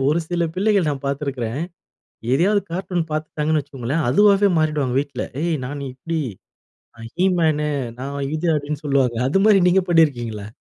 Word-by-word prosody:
ஒரு 155 Hz, +3 st, +2 dB
சில 170 Hz, -1 st, 0 dB
பிள்ளைகள் 195 Hz, -4 st, +2 dB
நான் 140 Hz, -1 st, -5 dB
பாத்துருக்கிறேன். 140 Hz, -2 st, -3 dB, 0.7 s
எதையாவது 200 Hz, +8 st, +3 dB
கார்ட்டூன் 180 Hz, -2 st, -2 dB
பாத்துட்டாங்கன்னு 155 Hz, 0 st, -1 dB
வச்சுக்கோங்களேன், 135 Hz, +5 st, -3 dB
அதுவாவே 205 Hz, +4 st, +5 dB
மாறிடுவாங்க 150 Hz, -5 st, 0 dB
வீட்ல, 145 Hz, 0 st, -4 dB, 0.2 s
"ஏய் 170 Hz, -2 st, 0 dB
நான் 145 Hz, +1 st, -6 dB
இப்படி, 160 Hz, +5 st, -4 dB, 0.8 s
நான் 115 Hz, 0 st, -10 dB
ஹீ 180 Hz, -, +2 dB
மேனு, 150 Hz, -2 st, +1 dB, 0.3 s
நான் 140 Hz, +2 st, -5 dB, 0.2 s
இது" 170 Hz, +2 st, -2 dB
அப்டின்னு 150 Hz, +1 st, -4 dB
சொல்லுவாங்க. 130 Hz, -4 st, +1 dB
அது 195 Hz, +8 st, +2 dB
மாரி 200 Hz, -3 st, +6 dB
நீங்க 190 Hz, +1 st, +3 dB
பண்ணியிருக்கீங்களா? 120 Hz, -11 st, +1 dB
150 Hz, 145 wpm, -21 LUFS, 140-175 Hz, 0.8 s, மாரி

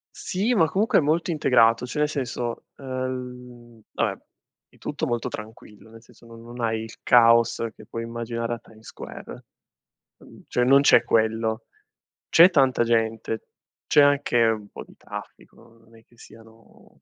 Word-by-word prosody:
Sì, 205 Hz, +6 st, -1 dB
ma 165 Hz, -6 st, +4 dB
comunque 205 Hz, +7 st, +1 dB
è -, -, +1 dB
molto 160 Hz, +4 st, 0 dB
integrato 120 Hz, -6 st, +3 dB
cioè, 135 Hz, -, -5 dB
nel 150 Hz, -, +1 dB
senso, 125 Hz, -5 st, -4 dB
el 135 Hz, -, -12 dB
mhmm, 125 Hz, -2 st, -7 dB, 0.2 s
vabbè, -, -, -1 dB, 0.5 s
è -, -, -25 dB
tutto 150 Hz, +2 st, -4 dB
molto 120 Hz, -5 st, -2 dB
tranquillo, 110 Hz, 0 st, -11 dB
nel 115 Hz, 0 st, -14 dB
senso 120 Hz, 0 st, -21 dB
non 115 Hz, 0 st, -13 dB
non 120 Hz, +1 st, -11 dB
hai 110 Hz, -1 st, -1 dB
il 115 Hz, 0 st, -9 dB
caos 115 Hz, -1 st, +4 dB
che -, -, -15 dB
puoi 115 Hz, 0 st, -6 dB
immaginare 115 Hz, 0 st, -4 dB
a 115 Hz, -, -6 dB
Times 110 Hz, 0 st, -19 dB
Square -, -, -10 dB, 0.8 s
ehm, -, -, -17 dB
cioè, 125 Hz, -, 0 dB
non 135 Hz, +2 st, +6 dB
c'è 140 Hz, -, +5 dB
quello; 110 Hz, 0 st, 0 dB, 0.6 s
c'è 170 Hz, +3 st, +7 dB
tanta 135 Hz, -7 st, +2 dB
gente, 115 Hz, -1 st, -1 dB, 0.4 s
c'è 150 Hz, -, +5 dB
anche 145 Hz, -4 st, +2 dB
un 110 Hz, -2 st, -1 dB
po' -, -, -10 dB
di -, -, -19 dB
traffico, 115 Hz, 0 st, -12 dB
non 115 Hz, 0 st, -21 dB
è 110 Hz, -, -20 dB
che 120 Hz, -, -27 dB
siano 115 Hz, 0 st, -19 dB
120 Hz, 165 wpm, -24 LUFS, 115-130 Hz, 0.8 s, c'è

